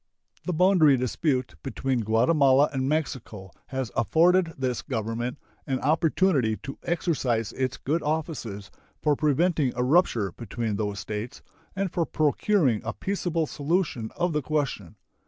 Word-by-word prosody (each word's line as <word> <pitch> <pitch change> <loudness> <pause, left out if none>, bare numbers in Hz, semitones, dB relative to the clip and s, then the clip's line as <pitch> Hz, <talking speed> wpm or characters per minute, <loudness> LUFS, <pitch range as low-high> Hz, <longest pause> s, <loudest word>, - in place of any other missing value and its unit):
The 180 - -1
boundary 170 -5 +5
dispute 130 +1 -1
between 135 -1 -2
Guatemala 130 +5 +3
and 130 0 -1
Mexico 120 - -3 0.2
has 130 -5 -3
afforded 170 - +3
this 130 -3 -1
Government 120 0 -3 0.3
an 130 -2 0
opportunity 155 - +2
to 135 - -7
exercise 135 - -1
its 130 0 -2
good 160 +4 -1
offices 145 - -3 0.3
for 150 -1 +3
preventing 150 -1 +2
a 125 - 0
rupture 125 - +2
between 115 -1 -4
those 105 -2 -2
States 105 +6 -6 0.3
and 195 -2 -1
for 170 -2 0
procuring 150 - +2
a 110 - -3
peaceable 175 - -1
solution 145 -6 -1
of 175 -1 0
the 150 - 0
question. 135 - -2
135 Hz, 135 wpm, -26 LUFS, 115-160 Hz, 0.3 s, boundary